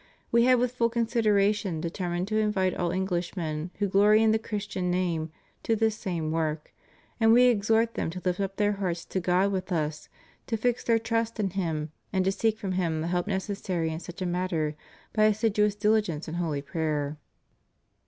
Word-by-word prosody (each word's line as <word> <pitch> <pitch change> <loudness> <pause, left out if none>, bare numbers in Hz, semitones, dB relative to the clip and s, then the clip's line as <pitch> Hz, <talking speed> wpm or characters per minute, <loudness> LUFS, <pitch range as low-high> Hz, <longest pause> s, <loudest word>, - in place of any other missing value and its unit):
We 235 0 +5
have 255 -1 +5
with 245 0 +1
full 235 -2 +1
consideration 210 -6 +1
determined 175 +2 -3
to 215 0 +1
invite 200 -4 +1
all 175 -2 -1
Englishmen 175 -3 -2
who 205 - +1
glory 210 +3 +5
in 220 - +4
the 220 - +2
Christian 200 -4 -3
name 175 -3 0 0.3
to 225 - +1
this 220 0 +1
same 170 -6 -3
work, 155 -1 -2 0.5
and 225 -1 +5
We 245 +2 +7
exhort 225 -1 +3
them - - -2
to 180 +2 -6
lift 180 0 0
up 195 -1 -2
their 205 0 +2
hearts 185 -4 -3
to 190 - -2
God 185 +3 +2
with 185 0 -3
Us, 150 -3 -2 0.4
to 225 - -1
fix 245 +2 0
their 230 -1 +3
trust 230 0 -1
in 195 -3 0
Him, 160 -5 -2 0.2
and 190 -2 +1
to 195 - +3
seek 220 +2 0
from 195 -3 -4
Him 170 -4 0
the 165 - -2
help 175 +1 0
necessary 190 -4 -2
in 160 - -4
such 175 +2 -7
a - - -1
matter 175 -4 -1 0.4
by 215 -1 +4
assiduous 210 -1 +2
diligence 210 -7 +1
in 160 - -5
holy 160 -5 -2
prayer. 150 -1 -2
190 Hz, 190 wpm, -27 LUFS, 170-215 Hz, 0.5 s, We